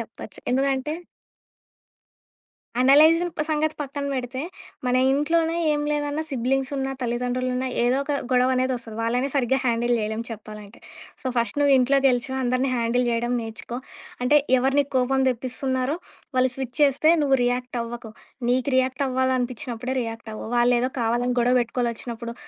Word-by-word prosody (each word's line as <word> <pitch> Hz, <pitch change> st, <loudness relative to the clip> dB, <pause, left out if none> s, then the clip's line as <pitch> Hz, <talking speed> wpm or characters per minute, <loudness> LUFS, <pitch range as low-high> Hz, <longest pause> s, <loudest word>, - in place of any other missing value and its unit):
చెప్పొచ్చు. 220 Hz, -3 st, -9 dB
ఎందుకంటే 270 Hz, +2 st, 0 dB, 1.9 s
అనలైజిన్ 315 Hz, +6 st, +6 dB, 0.2 s
సంగతి 310 Hz, 0 st, 0 dB
పక్కన 285 Hz, 0 st, -4 dB
పెడితే, 255 Hz, 0 st, -3 dB, 0.5 s
మన 250 Hz, -, +2 dB, 0.2 s
ఇంట్లోనే 325 Hz, +3 st, +1 dB, 0.2 s
ఏం 295 Hz, -1 st, +1 dB
లేదన్నా 295 Hz, +1 st, -1 dB
సిబ్లింగ్సున్నా, 270 Hz, +1 st, -1 dB
తల్లిదండ్రులున్నా 250 Hz, +1 st, -1 dB, 0.2 s
ఏదో 245 Hz, +2 st, +3 dB
ఒక 290 Hz, -, -2 dB, 0.2 s
గొడవ 255 Hz, 0 st, +3 dB
అనేదొస్తది. 255 Hz, -3 st, -2 dB
వాళ్ళనే 245 Hz, +4 st, 0 dB
సరిగ్గా 265 Hz, -1 st, +2 dB
హ్యాండిల్ 240 Hz, 0 st, +1 dB
చేయలేం 220 Hz, +1 st, -2 dB
చెప్పాలంటే. 210 Hz, -1 st, -9 dB, 0.4 s
సో, -, -, -5 dB
ఫస్ట్ 235 Hz, +3 st, 0 dB
నువ్వు 285 Hz, -1 st, +4 dB
ఇంట్లో 270 Hz, +2 st, +3 dB
గెలిచి 250 Hz, 0 st, +1 dB
అందరిని 255 Hz, +1 st, +1 dB
హ్యాండిల్ 240 Hz, +1 st, +1 dB
చేయడం 235 Hz, +1 st, 0 dB
నేర్చుకో. 225 Hz, +2 st, -6 dB, 0.5 s
అంటే 295 Hz, +4 st, +5 dB, 0.2 s
ఎవరు 265 Hz, +2 st, +1 dB
నీకు 285 Hz, 0 st, -3 dB
కోపం 265 Hz, +1 st, +2 dB
తెప్పిస్తున్నారో 260 Hz, +3 st, -2 dB, 0.4 s
వాళ్ళు 255 Hz, 0 st, +3 dB
స్విచ్చేస్తే 270 Hz, +3 st, +1 dB
నువ్వు 270 Hz, -2 st, +3 dB
రియాక్టవ్వకు. 240 Hz, -2 st, -3 dB, 0.4 s
నీకు 255 Hz, +2 st, +1 dB
రియాక్టవ్వాలనిపిచ్చినప్పుడే 260 Hz, -1 st, -1 dB
రియాక్టవ్వు. 225 Hz, -1 st, -7 dB, 0.3 s
ఏదో 250 Hz, +2 st, +1 dB
కావాలని 240 Hz, +2 st, +1 dB
గొడవ 245 Hz, +1 st, +3 dB
పెట్టుకోవాలి 240 Hz, +1 st, -1 dB
వచ్చినప్పుడు 235 Hz, 0 st, -6 dB
255 Hz, 125 wpm, -24 LUFS, 240-270 Hz, 1.9 s, అనలైజిన్